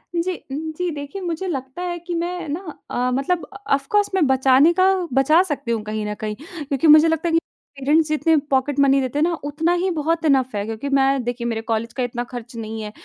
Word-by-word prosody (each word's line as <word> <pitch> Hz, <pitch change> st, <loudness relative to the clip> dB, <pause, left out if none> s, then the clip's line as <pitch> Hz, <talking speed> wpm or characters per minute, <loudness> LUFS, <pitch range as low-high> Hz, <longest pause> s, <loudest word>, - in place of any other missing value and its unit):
जी, 350 Hz, +2 st, 0 dB, 0.2 s
उम, 315 Hz, +3 st, -4 dB
जी। 360 Hz, 0 st, -1 dB
देखिए 290 Hz, +6 st, -6 dB
मुझे 350 Hz, +1 st, -3 dB
लगता 270 Hz, 0 st, -5 dB
है 350 Hz, -1 st, -3 dB
कि 345 Hz, +1 st, -6 dB
मैं 345 Hz, 0 st, -3 dB
ना 305 Hz, -, -2 dB, 0.3 s
अ, 250 Hz, +1 st, 0 dB
मतलब 300 Hz, +7 st, 0 dB, 0.2 s
ऑफ 275 Hz, 0 st, +1 dB
कोर्स 415 Hz, -1 st, +3 dB
मैं 365 Hz, -5 st, +3 dB
बचाने 265 Hz, +3 st, +5 dB
का 380 Hz, +1 st, +4 dB, 0.2 s
बचा 270 Hz, +6 st, +5 dB
सकती 275 Hz, -4 st, -3 dB
हूँ 225 Hz, -2 st, 0 dB
कहीं 215 Hz, 0 st, -4 dB
न 210 Hz, -, -2 dB
कहीं 210 Hz, 0 st, -3 dB
क्योंकि 300 Hz, -, -3 dB
मुझे 305 Hz, +2 st, +8 dB
लगता 325 Hz, +1 st, 0 dB
है -, -, -2 dB
कि 330 Hz, -, +5 dB, 0.4 s
पेरेंट्स 300 Hz, +4 st, +3 dB
जितने 320 Hz, +1 st, +2 dB, 0.2 s
पॉकेट 270 Hz, +1 st, +1 dB
मनी 275 Hz, 0 st, +5 dB
देते 260 Hz, +2 st, -2 dB
हैं 305 Hz, -, +3 dB
ना 345 Hz, -, +2 dB
उतना 320 Hz, +4 st, 0 dB
ही 375 Hz, +2 st, 0 dB
बहुत 325 Hz, +2 st, 0 dB
इनफ 260 Hz, -6 st, +2 dB
है 200 Hz, -, -1 dB
क्योंकि 225 Hz, +5 st, -4 dB
मैं 270 Hz, -1 st, +2 dB
देखिए 240 Hz, 0 st, -3 dB
मेरे 225 Hz, -1 st, -2 dB
कॉलेज 225 Hz, 0 st, -2 dB
का 255 Hz, -, -2 dB
इतना 245 Hz, 0 st, -3 dB
खर्च 240 Hz, -1 st, -8 dB
नहीं 220 Hz, -1 st, -5 dB
है 210 Hz, -, -6 dB
280 Hz, 230 wpm, -21 LUFS, 250-330 Hz, 0.4 s, मुझे